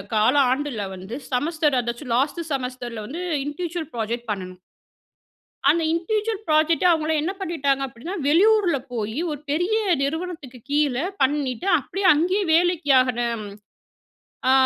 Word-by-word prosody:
கால 215 +4 +4 0.2
ஆண்டுல 265 -5 -2
வந்து 190 +5 -7 0.2
செமஸ்டர் 295 +2 +1
அதாச்சும் 235 +1 -4
லாஸ்ட்டு 295 +6 0
செமஸ்டர்ல 250 -4 -4
வந்து 320 +9 -6 0.2
இன்டிவிஜுவல் 330 +1 -4
ப்ராஜெக்ட் 235 +1 -3
பண்ணணும். 185 -2 -6 1.1
அந்த 335 - +3
இன்டிவிஜுவல் 430 +5 -1
புராஜெக்ட் 310 +2 +3
அவங்கள 320 -1 +1
என்ன 335 +5 -1
பண்ணிட்டாங்க 285 -7 0
அப்டின்னா, 260 +10 -7
வெளியூர்ல 375 +1 +4 0.2
போயி, 220 0 -3
ஒரு 295 - -5
பெரிய 355 +8 +1 0.3
நிறுவனத்துக்கு 305 -4 -4
கீழ 290 -3 +2 0.3
பண்ணிட்டு 280 +3 0
அப்டியே, 380 +8 -1
அங்கேயே 365 +7 +1
வேலைக்கு 340 -3 +2
ஆகற. 250 -2 -1 1.3
ஆ - - +6
295 Hz, 125 wpm, -23 LUFS, 250-340 Hz, 1.3 s, ஆ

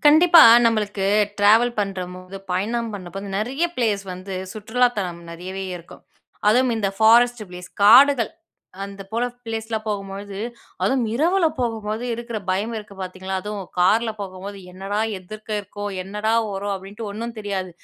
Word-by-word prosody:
கண்டிப்பா, 325 +3 +8 0.2
நம்மளுக்கு 210 -3 +1 0.3
ட்ராவல் 225 +4 +4
பண்றம்போது 185 -1 -5 0.2
பயணம் 225 +5 -1
பண்ணும்போது 190 -1 -7
வந்து, 195 -1 -4
நிறைய 260 +10 -1
பிளேஸ் 215 -5 +1
வந்து 185 +1 -7 0.2
சுற்றுலா 225 +4 +1
தலம் 175 -3 -3
நிறையவே 185 +3 -6
இருக்கும், 170 -1 -14 0.5
அதுவும் 250 +3 +4
இந்த 200 -2 0
ஃபாரஸ்ட் 235 +1 +5
பிளேஸ் 180 0 -10
காடுகள் 250 +2 +7 0.5
அந்த 200 0 -8
போல 230 +2 0 0.2
பிளேஸ்லாம் 225 -1 -4
போகும்பொழுது, 200 -1 -5 0.4
அதுவும் 260 -2 +2
இரவில 340 +7 +3
போகும்போது, 220 -2 -2
இருக்கிற 235 -1 -5
பயம் 200 +5 -1
இருக்கு 210 -1 -11
பார்த்தீங்களா, 190 +1 -4
அதுவும் 205 -2 -6
காரில 220 +6 +3
போகும்போது, 195 +1 -7
"என்னடா! 195 +3 -4 0.2
எதிர்க்க 215 +4 -11
இருக்கோ? 205 +1 -8 0.2
என்னடா 210 +3 -2 0.2
வரும்?" 200 0 -3
அப்படின்ட்டு 200 +4 -8
ஒண்ணும் 230 +3 -5
தெரியாது, 195 -3 -3
205 Hz, 140 wpm, -22 LUFS, 195-230 Hz, 0.5 s, கண்டிப்பா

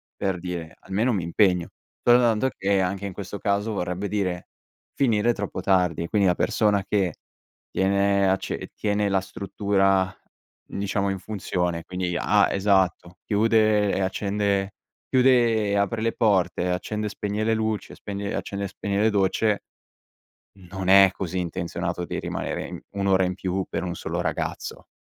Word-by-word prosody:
per 95 -2 -2
dire, 85 -2 -6
almeno 105 +6 0
m'impegno. 90 -1 +2 0.3
Soltanto 120 0 +4
che, 100 0 +2
anche 95 +2 -2
in 95 - -7
questo 100 +1 -6
caso, 100 +2 0
vorrebbe 90 +1 -2
dire 90 -4 -2 0.5
finire 120 -3 +2
troppo 100 -3 -4
tardi, 90 -3 +1
quindi 100 0 +2
la 90 - +3
persona 105 -3 +2
che 95 -5 0 0.6
tiene 100 +1 +2
acce 95 0 -2
tiene 105 -1 0
la 95 -1 +2
struttura, 95 -1 0 0.5
diciamo, 100 0 -2
in 95 -1 -2
funzione 90 -3 -2
quindi 90 0 -3
ha 105 0 +4
esatto, 95 -3 +1
chiude 110 -1 +3
e - - 0
accende 100 +1 0 0.4
chiude 120 -5 +4
e - - +1
apre 100 +3 0
le 115 0 0
porte, 90 -5 +1
accende 105 +4 -2
e - - -3
spegne 105 +1 -3
le 115 +1 +2
luci, 110 -1 -2
spegne 100 0 -5
e - - -3
accende 100 0 -4
e - - -2
spegne 100 +1 -2
le 110 - +4
docce, 105 +1 +1 1.1
non 95 -1 -4
è 95 0 +8
così 95 -1 -3
intenzionato 85 0 -3
di - - -4
rimanere - - -4
i - - -8
1 100 0 -2
ora 95 -1 +4
in 90 - -1
più 95 +1 -2
per - - -3
1 90 -1 -3
solo - - -3
ragazzo. - - -4
100 Hz, 155 wpm, -25 LUFS, 95-105 Hz, 1.1 s, è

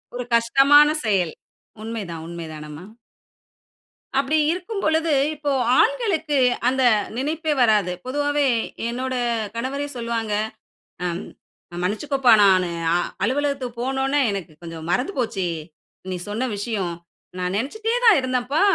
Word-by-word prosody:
ஒரு 250 - -3
கஷ்டமான 275 +6 +6
செயல். 190 -7 +1 0.5
உண்மைதான் 200 -8 -5
உண்மை 170 -1 -6
தானம்மா. 150 +2 -9 1.3
அப்படி 280 +3 +1
இருக்கும்பொழுது. 335 -4 0 0.2
இப்போ, 295 -1 -2 0.3
ஆண்களுக்கு 395 - +1 0.3
அந்த 265 +1 +2 0.3
நினைப்பே 310 +3 -1
வராது. 210 -6 +3
பொதுவாவே, 290 +2 +1 0.4
என்னோட 255 +2 -3 0.4
கணவரே 275 +5 -3
சொல்லுவாங்க. 230 -2 -2 0.7
அ - - +1 0.8
மன்னிச்சுக்கோப்பா 250 +6 +2
நானு 185 -3 +4 0.2
அ - - +4 0.3
அலுவலகத்துக்கு 265 -1 -1
போனோன, 265 +1 -1 0.2
எனக்கு 190 -5 -5
கொஞ்சம் 165 -1 -8
மறந்து 250 - 0
போச்சு! 220 -7 -1 0.6
நீ 185 - -2
சொன்ன 220 +5 -2
விஷயம். 200 -5 -2 0.4
நான் 180 +1 -2
நெனச்சிட்டே 435 - -2
தான் 435 -8 +7
இருந்தேன்ப்பா, 255 +2 0
250 Hz, 110 wpm, -22 LUFS, 200-290 Hz, 1.3 s, தான்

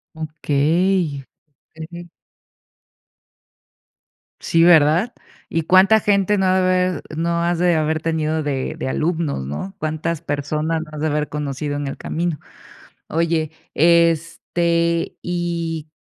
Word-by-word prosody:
Okey, 155 +1 0 0.6
ujú. 170 +2 -8 2.4
Sí, 165 0 +3
¿verdad? 170 +6 +5 0.4
¿Y 165 - -1
cuánta 190 +6 +5
gente 205 0 +2
no 190 - +2
ha 185 0 +3
de - - +2 0.4
haber - - -15
no 170 +1 0
has 175 0 0
de 175 -1 +3
haber 155 0 0
tenido 160 -1 -1
de 140 -3 -2
de - - -4
alumnos, 155 - -1
no? 75 - -6
¿Cuántas 155 +1 -3
personas 155 +2 -2
no 155 - -13
has 150 - -7
de 155 - +1
haber 150 0 -1
conocido 145 0 -3
en 145 0 -3
el 135 - -4
camino? 165 -2 -3 0.7
Oye, 165 -1 0 0.2
este, 170 +1 +2
y, 170 -3 -3
165 Hz, 125 wpm, -20 LUFS, 150-170 Hz, 2.4 s, verdad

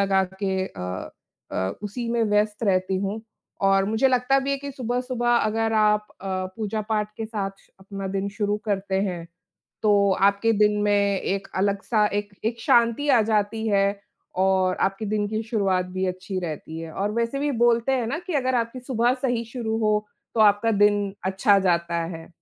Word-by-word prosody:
लगा 195 -1 +3 0.2
के 190 -1 0
अ 90 - -6 0.4
अ, 95 +1 -1
उसी 230 +3 -4
में 235 0 +1
व्यस्त 210 +1 +1
रहती 185 -1 +1
हूँ 200 +3 -3 0.4
और 195 0 +4
मुझे 220 +6 +2
लगता 255 +1 +3
भी 270 +1 -2
है 275 - +1
कि 280 +1 -6
सुबह-सुबह 250 -1 -2
अगर 225 0 +1
आप 210 -1 +3
अ, 195 - -8 0.3
पूजा-पाठ 215 0 -2
के 225 - -4
साथ 205 -3 -3
श - - -27
अपना 195 0 -6
दिन 195 +1 -2
शुरू 205 0 -1
करते 195 -2 -2
हैं, 180 -4 -3 0.6
तो 205 -2 +4
आपके 200 +3 +3
दिन 210 0 +4
में 200 -1 +2
एक 195 0 -2
अलग-सा 200 +3 +1
एक 205 0 -2
एक 230 +1 -1
शांति 235 +6 +3
आ 245 -4 +6
जाती 220 +1 0
है 200 -2 +3 0.6
और 185 -1 +2
आपके 195 +3 0
दिन 210 0 0
की 215 +1 -2
शुरुआत 195 -5 0
भी 190 0 0
अच्छी 185 +1 -4
रहती 160 -1 -6
है। 165 -1 -7
और 205 +2 -1
वैसे 235 +4 -1
भी 290 +1 0
बोलते 235 +2 +3
हैं 250 -4 0
ना 280 - -2
कि 365 - -3
अगर 260 -2 +1
आपकी 235 +1 -1
सुबह 245 -1 +1
सही 245 -3 0
शुरू 225 -3 -2
हो, 210 0 +2 0.3
तो - - 0
आपका 210 +2 +4
दिन 205 -1 +2
अच्छा 190 +2 +3
जाता 170 -2 +1
है। 165 - -10
210 Hz, 180 wpm, -24 LUFS, 195-230 Hz, 0.6 s, आ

